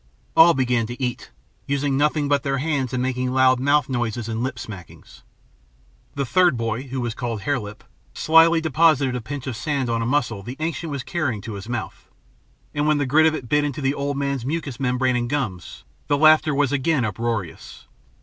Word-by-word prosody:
All 170 +1 +7
began 125 -3 +1
to 120 +3 -8
eat, 125 -2 -3 0.4
using 140 0 0
nothing 150 +1 +1
but 140 -1 +2
their 135 -2 -1
hands 135 -3 -1
and 125 -1 -1
making 130 0 -1
loud 130 -1 +4
mouth 145 +1 +2
noises 120 -3 -2
and 115 0 -3
lip 130 0 -2
smackings. 100 -5 -11 0.9
The 140 -1 -1
third 175 0 +3
boy, 115 +3 -3
who 130 +1 -4
was 120 -2 -2
called 115 -3 -4
Hare 145 +2 0
Lip, 105 -1 -9 0.3
slyly 165 +1 +4
deposited 155 -4 +2
a 125 - -3
pinch 135 +4 -6
of 130 -4 -4
sand 135 0 -2
on 115 0 0
a 115 - -1
mussel 120 -6 0
the 125 +7 -8
ancient 165 +1 -3
was 140 -3 -4
carrying 150 -11 -2
to 110 +2 -7
his 100 +3 -8
mouth; 110 -4 -6 0.6
and 150 0 0
when 155 -1 +3
the 145 - 0
grit 155 +4 +4
of 160 - +1
it 130 -6 -7
bit 150 +4 +2
into 145 -1 -3
the 135 -1 0
old 140 0 -3
fellow's 140 -3 -2
mucous 140 -3 -4
membrane 125 -1 +1
and 120 -1 -1
gums, 110 - -4 0.2
the 145 - +2
laughter 155 0 +5
was 145 -2 +1
again 145 -2 +1
uproarious. 110 -3 -4
130 Hz, 200 wpm, -22 LUFS, 120-145 Hz, 0.9 s, All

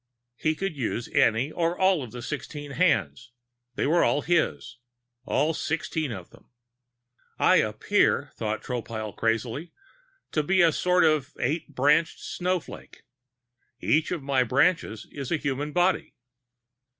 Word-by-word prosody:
He 155 +5 0
could 195 -1 -3
use 120 -2 -3
any 115 +6 +2
or 170 +1 -1
all 190 -4 +3
of 125 -4 -7
the 120 0 -8
sixteen 145 0 -6
hands. 120 - 0 0.4
They - - 0
were 165 +4 +3
all 145 - +2
his, 125 - 0 0.5
all 150 +3 +1
sixteen 155 -2 -2
of 95 -6 -8
them. - - -20 0.9
I - - +5
appear, - - +1
thought 110 0 -3
Tropile 115 -4 -5
crazily, 115 +7 -2 0.6
to 155 - +1
be 180 +4 +3
a 165 - +5
sort 180 +2 +2
of 155 -4 +2
eight 145 +2 -2
branched 150 +5 +3
snowflake. 180 -1 -4 0.8
Each 155 +1 +2
of 170 -6 -3
my 135 -1 +2
branches 125 - +1
is 140 -3 -6
a 170 - +2
human 145 0 -3
body. 175 +3 +1
145 Hz, 140 wpm, -26 LUFS, 120-165 Hz, 0.9 s, I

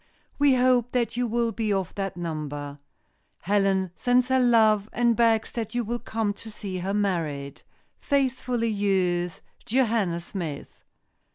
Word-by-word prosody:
We 285 -2 +5
hope 250 -1 +2
that 240 -2 0
you 245 0 0
will 235 0 0
be 220 -1 -2
of 190 -3 -1
that 195 -2 -4
number. 145 -4 -5 0.6
Helen 195 -2 +1
sends 245 +5 +2
her 260 0 +3
love 220 -4 +4
and 235 -1 +2
begs 225 -1 +2
that 230 0 -5
you 245 - +1
will 240 +2 -3
come 225 -3 -2
to 225 - -9
see 195 -3 -6
her 190 +2 -2
married. 155 -8 -2 0.4
"Faithfully 255 -4 0
yours, 185 -4 0 0.2
"Joanna 220 -8 +1
Smith." 170 -4 -7
215 Hz, 145 wpm, -26 LUFS, 180-240 Hz, 0.6 s, We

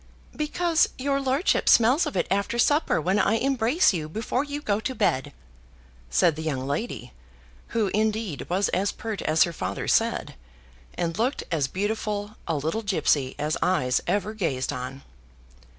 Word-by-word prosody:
"Because 330 +2 +1
your 275 +1 0
lordship 270 +6 +1
smells 245 +8 +5
of - - -4
it - - +1
after 200 +4 0
supper, 290 - +3
when 185 +6 +1
I 210 - +3
embrace 255 - +2
you 155 -3 -3
before 225 - -1
you 290 0 -5
go 210 -7 0
to 260 +4 -4
bed," 135 - 0 0.8
said 145 - +3
the 155 - -6
young 140 -5 -2
lady, 140 - -4 0.5
who, 220 -4 0
indeed, 215 -6 -1
was 185 +3 +1
as 195 +3 0
pert 220 -3 -5
as 155 +1 +4
her 170 - -3
father 95 - -4
said, - - +1 0.6
and 170 +3 -2
looked 250 +5 0
as 150 -5 +1
beautiful 205 - -3
a 165 - 0
little 160 +9 -2
gipsy 150 -10 +1
as 150 +1 -1
eyes 130 -9 +2
ever 205 +1 0
gazed 145 -11 -2
on. 130 +1 -6
205 Hz, 160 wpm, -25 LUFS, 155-230 Hz, 0.8 s, smells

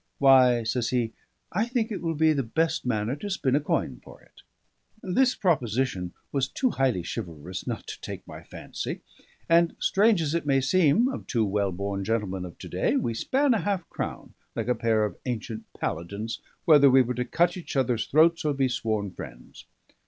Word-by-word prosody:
"Why," 130 -3 +5
says 115 +1 -1
he, 120 -3 0 0.4
"I 215 +6 0
think 240 -2 -1
it 205 - -4
will 165 -2 -1
be 160 +1 +4
the 140 - 0
best 160 +4 -1
manner 110 +1 0
to 205 - -6
spin 140 -9 0
a - - +4
coin 150 - -2
for - - -14
it." - - -21 0.6
This 250 +8 +2
proposition 125 - 0 0.2
was 135 -2 0
too 255 - 0
highly 130 -10 +1
chivalrous 90 -3 -6
not - - -4
to - - -8
take - - -7
my - - -9
fancy; - - -6 0.5
and, 170 0 +4
strange 205 0 +3
as 150 0 -1
it 170 -3 -1
may 135 -1 +4
seem 160 - +3
of 265 - -5
two 115 -4 +1
well 100 -1 0
born 100 +2 -3
gentlemen 95 -4 -2
of 90 - -10
to - - -9
day, - - 0
we 115 - 0
span 265 - +2
a 225 - +1
half 190 -1 -2
crown - - -5 0.2
(like 115 -1 -2
a - - +4
pair 110 -3 +1
of 105 - -6
ancient 115 -2 -5
paladins) 100 +7 -4 0.3
whether 145 -4 +7
we 130 0 +6
were 125 +1 -2
to 125 +1 -1
cut 170 +7 +1
each 180 -5 -7
other's 125 -4 +1
throats 165 +3 +4
or 150 -2 0
be 135 -1 +2
sworn 110 -5 -2
friends. - - -11
130 Hz, 195 wpm, -26 LUFS, 110-165 Hz, 0.6 s, whether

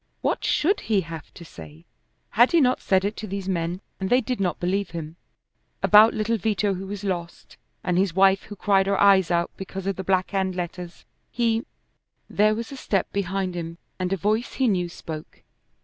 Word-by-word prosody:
What - - -1
should 390 +7 +2
he 210 -3 +1
have 165 -2 -9
to 170 - -11
say? 80 - -13 0.5
Had 240 +8 +4
he 340 - +6
not 255 -3 +2
said 190 0 +2
it 205 +2 -2
to 215 - -6
these 195 -1 -5
men 175 0 -2 0.2
and 190 -1 -2
they 250 - +5
did 250 -1 -3
not 180 -4 -1
believe 190 +2 -1
him? 165 -1 -7 0.7
About 215 +2 +7
little 225 +2 0
Vito 205 0 0
who 190 +1 -6
was 205 0 -6
lost, 175 -3 -5 0.3
and 180 0 +1
his 185 -3 0
wife 195 0 +5
who 205 - -9
cried 195 -1 +2
her 200 0 +1
eyes 195 -3 +5
out 170 -1 +1
because 190 0 -7
of 195 -1 -2
the 190 - -4
Black 185 0 +1
Hand 190 -2 -1
letters. 175 0 -6 0.2
He 230 -1 0 0.6
There 215 +1 +2
was 230 +2 -5
a 275 - -7
step 200 -6 -1
behind 195 -1 -1
him, 170 -1 -6 0.2
and 185 0 -2
a 195 - +1
voice 215 - 0
he 265 - +1
knew 180 -5 +1
spoke. 160 -2 -9
195 Hz, 200 wpm, -24 LUFS, 175-210 Hz, 0.7 s, About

